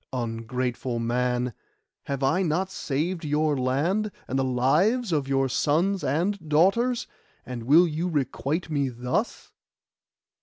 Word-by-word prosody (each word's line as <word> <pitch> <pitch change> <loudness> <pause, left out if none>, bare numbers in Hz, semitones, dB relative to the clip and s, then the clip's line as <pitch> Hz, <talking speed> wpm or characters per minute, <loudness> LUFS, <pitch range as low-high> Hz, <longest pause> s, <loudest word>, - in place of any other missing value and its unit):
Ungrateful 120 +1 -3
man! 125 +1 0 0.5
have 140 -1 -3
I 140 +8 +2
not 185 +2 0
saved 165 +2 -2
your 150 0 +1
land, 155 +12 0 0.2
and 130 - -1
the - - +2
lives 160 - +2
of 145 -4 0
your 135 0 +2
sons 170 +9 +1
and 170 +4 -1
daughters, 195 +11 +3 0.4
and 120 -3 -6
will 160 +7 +6
you 165 +3 -2
requite 150 +2 -2
me 140 -3 +1
thus? 125 +1 -3
145 Hz, 125 wpm, -26 LUFS, 130-175 Hz, 0.5 s, will